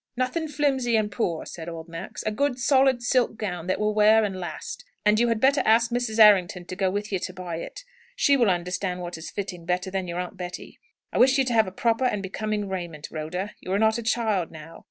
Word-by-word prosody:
Nothing 315 +6 -1
flimsy 270 -5 +1
and 215 -1 +1
poor," 175 -9 -2
said 165 0 -7
old 165 0 -8
Max. 165 +6 -7
"A 215 - -1
good, 275 +3 0
solid 265 -1 +3
silk 245 -2 +1
gown, 180 -5 -4
that 185 - 0
will 210 0 +1
wear 215 +1 +5
and 200 -2 -2
last. 170 -4 -6 0.2
And 210 +1 +4
you 240 - +3
had 230 -2 +1
better 275 +4 +4
ask 230 +2 +3
Mrs. 240 -2 -1
Errington 190 -5 +5
to 185 - -7
go 190 0 +1
with 205 +2 -3
you 190 - 0
to 185 - -5
buy 180 -3 -5
it. 170 - -8 0.3
She 285 - +4
will 240 -6 +3
understand 180 +1 -2
what 175 0 -5
is 160 - -7
fitting 185 -4 -5
better 180 +2 -2
than 190 -1 -2
your 170 0 -4
aunt 180 +1 -5
Betty. 180 -1 -8 0.3
I - - 0
wish 260 +2 +5
you 270 - +3
to 250 - -1
have 215 -5 +2
proper 230 +2 +1
and 210 -5 0
becoming 210 +1 -3
raiment, 175 -5 -5
Rhoda. 180 +6 -4
You 185 - -5
are - - +3
not 220 +2 +2
a - - -3
child 220 -6 0
now. 160 +1 -11
210 Hz, 235 wpm, -25 LUFS, 180-235 Hz, 0.3 s, wear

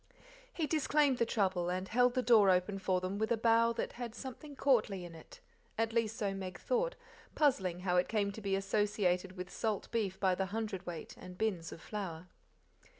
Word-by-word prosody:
He 335 -9 -1
disclaimed 295 -3 +2
the 235 - +2
trouble, 190 -5 +1
and 185 +1 -2
held 245 +3 +3
the 255 - +1
door 220 -5 +6
open 185 +2 +2
for 185 -1 +1
them 185 +2 -3
with 220 +1 0
a 235 - +3
bow 230 +1 +4
that - - -3
had 240 -2 -6
something 280 +2 -8
courtly 215 -10 +2
in 170 - -9
it, 160 - -13 0.4
at 225 0 0
least 225 -1 0
so 200 -2 -1
Meg 190 -2 -6
thought, - - 0 0.4
puzzling 190 - +2
how 180 -1 +1
it 180 - +3
came 205 -2 +1
to 220 - -9
be 195 -1 0
associated 195 -2 0
with 180 0 -6
salt 215 -3 -2
beef 200 -5 -1
by 190 -2 +3
the 190 +1 -1
hundredweight 195 -5 -5
and 180 0 -10
bins 190 -6 -1
of 165 - -9
flour. 180 -5 -5
205 Hz, 195 wpm, -34 LUFS, 185-230 Hz, 0.4 s, door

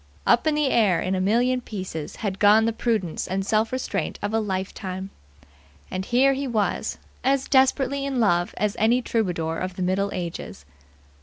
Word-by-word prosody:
Up 240 - +3
in 305 - +2
the 300 -3 +1
air 200 -7 +3
in 185 - -1
a 185 - 0
million 245 +6 +2
pieces 185 -9 -6
had 200 -3 -4
gone 210 +2 +6
the 230 - 0
prudence 215 -8 -1
and 190 +1 -2
self 220 +2 +1
restraint 255 0 -2
of 205 - -2
a 225 - +3
lifetime. 190 -1 -4 0.8
And 185 0 -3
here 260 +4 +4
he 275 +1 -3
was, 215 -5 -1 0.3
as 270 0 +1
desperately 270 0 +2
in 275 -2 -2
love 175 -6 +2
as 210 +1 0
any 235 +3 +3
troubadour 175 -9 -1
of 185 0 -4
the 185 - -3
Middle 190 +2 0
Ages. 170 - -6
210 Hz, 175 wpm, -24 LUFS, 185-245 Hz, 0.8 s, gone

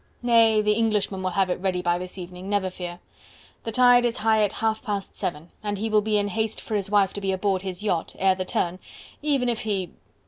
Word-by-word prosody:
"Nay! 225 -3 +5
the 210 - +3
Englishman 210 -3 0
will 185 - 0
have 185 0 +1
it - - -2
ready 180 -1 -1
by 175 0 +1
this 185 +1 -7
evening, 180 +1 -8
never 200 -2 0
fear. 175 -1 -7 0.7
The 225 - -2
tide 245 +1 +6
is 240 -1 0
high 220 0 +3
at 205 - 0
half 220 -1 -1
past 205 -4 -4
seven, 165 0 -4
and 205 -1 -2
he 220 +2 -2
will 215 -1 +4
be 215 0 +1
in 205 0 0
haste 220 +2 -1
for 220 - -7
his 200 -2 -1
wife 200 -2 +3
to 200 - -5
be 195 -1 0
aboard 190 0 0
his 190 0 -6
yacht, 180 -6 -1
ere 190 0 +4
the 185 0 -3
turn, 180 0 -2 0.4
even 280 -4 +1
if 235 -2 0
he..." 195 -4 -2
205 Hz, 235 wpm, -25 LUFS, 185-220 Hz, 0.7 s, tide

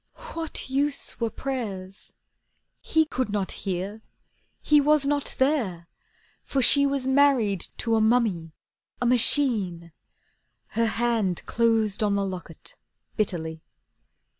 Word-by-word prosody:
What 325 -1 -4
use 280 +2 -2
were 230 -1 0
prayers! 210 -7 -6 0.7
He 320 0 +2
could 255 -6 -2
not 200 -2 -1
hear, 195 +3 -4 0.6
he 300 -1 +4
was 300 0 +3
not 285 0 0
there, 225 - 0 0.5
for 275 - -2
she 280 +2 +5
Was 275 -2 -1
married 265 -8 +3
to 230 - -1
a 220 - +3
mummy, 215 -8 +1 0.5
a 245 - -1
machine. 225 - +2 0.8
Her 230 0 0
hand 225 -5 -1
closed 225 -3 +1
on 205 -2 +2
the 200 0 0
locket 185 - -8 0.4
bitterly. 160 -6 -2
230 Hz, 115 wpm, -25 LUFS, 195-275 Hz, 0.8 s, she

